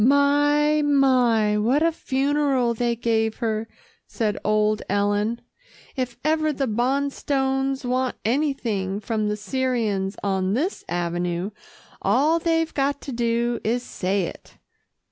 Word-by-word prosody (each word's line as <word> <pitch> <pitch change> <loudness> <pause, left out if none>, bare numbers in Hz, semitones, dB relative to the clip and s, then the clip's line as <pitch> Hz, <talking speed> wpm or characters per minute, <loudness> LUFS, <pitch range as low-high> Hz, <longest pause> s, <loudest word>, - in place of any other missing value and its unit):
"My! 290 +3 +4
my! 250 -7 +3
what 255 +8 +2
a 330 - +3
funeral 275 -4 +1
they 235 +1 0
gave 225 -1 0
her," 225 -2 -2 0.4
said 215 -3 -1
old 215 0 +2
Ellen. 205 +3 0 0.5
"If 250 -3 -3
ever 310 0 +2
the 275 -1 -1
Bonstones 270 +2 0
want 255 +1 0
anything 225 -7 -1
from 215 0 -1
the 210 - -2
Syrians 215 -4 -1
on 190 0 0
this 335 - -2
avenue, 175 +2 -2 0.5
all 305 +6 +3
they've 325 -1 0
got 280 0 0
to 275 - -6
do 235 0 0
is 240 +3 0
to - - -13
say 195 +2 -1
it." - - -8
240 Hz, 125 wpm, -23 LUFS, 210-280 Hz, 0.5 s, My